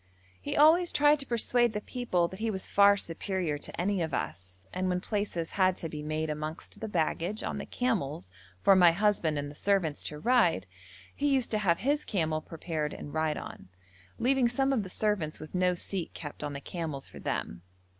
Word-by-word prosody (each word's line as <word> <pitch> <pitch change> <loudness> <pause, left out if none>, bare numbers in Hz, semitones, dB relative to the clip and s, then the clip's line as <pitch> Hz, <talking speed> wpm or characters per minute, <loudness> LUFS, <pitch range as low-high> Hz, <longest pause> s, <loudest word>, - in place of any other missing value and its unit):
He - - -3
always 330 +4 +6
tried 295 0 +4
to 275 - -6
persuade 240 0 +2
the 210 - -1
people 210 -7 0
that 190 +3 -10
he 225 +1 0
was 190 -3 -3
far 200 0 +6
superior 170 -3 -2
to - - -6
any 190 +1 +1
of 160 -1 -1
us, 95 +1 -5
and 185 0 -1
when 180 0 +1
places 195 -4 -2
had 185 -2 +3
to 165 - -5
be 150 -1 -6
made 155 +1 -2
amongst 155 +1 -5
the 220 - -4
baggage 180 +2 -1
on - - -3
the - - -6
camels 170 - -2 0.3
for 195 - +7
my 175 -2 +7
husband 185 -5 +1
and 145 0 -3
the - - -11
servants 175 -3 0
to 150 - -4
ride, 195 - +3 0.5
he 290 - 0
used 270 -4 +2
to 215 - +1
have 175 -5 +2
his 290 +4 +1
camel 160 -6 -1
prepared 155 -2 -4
and 145 - -8
ride 155 -1 0
on, - - -9 0.5
leaving 255 0 +3
some 270 +3 +1
of 245 - +1
the 190 - -7
servants 190 -6 -1
with 155 - -10
no 180 -1 +2
seat 180 0 -4
kept 145 -1 -7
on 145 -1 -3
the 140 - -6
camels 155 -4 -5
for - - -12
them. 85 - -3
180 Hz, 205 wpm, -30 LUFS, 155-215 Hz, 0.5 s, for